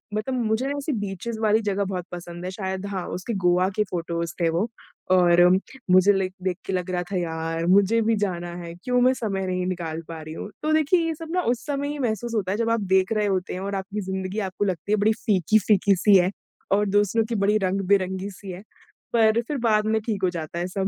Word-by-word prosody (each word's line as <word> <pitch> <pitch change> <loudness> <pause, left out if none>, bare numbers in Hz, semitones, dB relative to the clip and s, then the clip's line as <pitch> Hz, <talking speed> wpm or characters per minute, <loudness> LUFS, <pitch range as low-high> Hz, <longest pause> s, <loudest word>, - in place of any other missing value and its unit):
मतलब 215 +5 -2
मुझे 225 +1 0
ऐसी 285 +2 -3
बीचेज़ 205 +4 -5
वाली 220 0 +3
जगह 200 0 +1
बहुत 185 -2 -4
पसंद 175 0 -8
हैं 185 - -3
शायद 190 0 -4
हाँ, 190 -3 -4
उसके 185 +6 -4
गोवा 180 +1 +4
के 210 - +4
फ़ोटोज़ 170 -1 -3
थे 165 - +3
वो 175 +7 0 0.4
और 175 -1 +5 0.5
मुझे 185 +2 +6
लाईक 190 -1 -1
देख 185 -2 -1
के 190 - -3
लग 185 0 -2
रहा 180 -1 -1
था, 185 +3 -6
यार 165 -1 -2
मुझे 200 +5 +4
भी - - +3
जाना 175 -2 -4
है, 170 -1 -7
क्यों 250 0 +1
मैं 255 +1 +5
समय 195 -3 -1
नहीं 180 0 -1
निकाल 165 -3 -3
पा 165 -1 -6
रही 155 0 -8
हूँ 200 - -6
तो 310 0 +1
देखिए 315 +3 +3
ये 325 - -2
सब 325 +1 -8
ना 360 - +2
उस 240 - -15
समय 285 -1 -2
ही 295 0 -4
महसूस 230 -1 -2
होता 190 -3 0
है 200 - -1
जब 230 0 0
आप 230 -1 +1
देख 190 +2 +3
रहे 210 -1 +1
होते 185 -2 -1
हैं 180 - -4
और 200 0 -3
आपकी 195 +2 -4
ज़िंदगी 190 +1 -3
आपको 195 +2 -2
लगती 185 0 -3
है - - +5
बड़ी 220 - +5
फ़ीकी-फ़ीकी 200 0 +3
सी 200 +3 +5
है 180 +1 +2 0.4
और 205 +1 +3
दूसरों 205 +3 +2
की 235 - -1
बड़ी 205 +1 +2
रंग-बिरंगी 190 0 0
सी 195 +1 -11
है, 180 +2 -8 0.5
पर 225 0 +4
फिर 295 - -2
बाद 215 -2 +3
में 220 0 +1
ठीक 210 -3 -3
हो 185 - +4
जाता 170 -1 -5
है 175 - -1
सब। 190 +1 -2
195 Hz, 235 wpm, -24 LUFS, 180-220 Hz, 0.5 s, मुझे